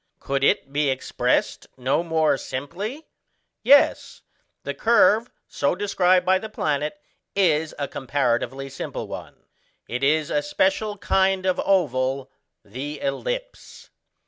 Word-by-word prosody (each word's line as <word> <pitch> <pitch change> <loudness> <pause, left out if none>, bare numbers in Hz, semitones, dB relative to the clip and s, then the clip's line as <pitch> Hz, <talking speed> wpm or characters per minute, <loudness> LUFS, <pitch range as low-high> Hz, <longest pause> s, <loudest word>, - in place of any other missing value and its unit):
Could 135 0 -2
it 135 0 +2
be 145 0 +1
expressed 130 0 -1
no 130 +5 +1
more 160 -3 +2
simply? 180 - -6 0.6
Yes, 285 +1 +4 0.4
the - - -3
curve 225 +1 +4 0.2
so 140 - 0
described 185 -2 +2
by 185 0 +3
the 220 - -7
planet 150 -2 -2 0.4
is 160 -5 +2
a 140 - -2
comparatively 135 0 -1
simple 135 0 -6
one: - - -9 0.4
it 125 +3 -4
is 150 +2 +2
a 150 - +2
special 195 +7 0
kind 190 -1 +1
of 185 -1 +1
oval 135 -7 0 0.3
the 135 +8 -6
ellipse. - - -5
155 Hz, 120 wpm, -23 LUFS, 135-195 Hz, 0.6 s, Yes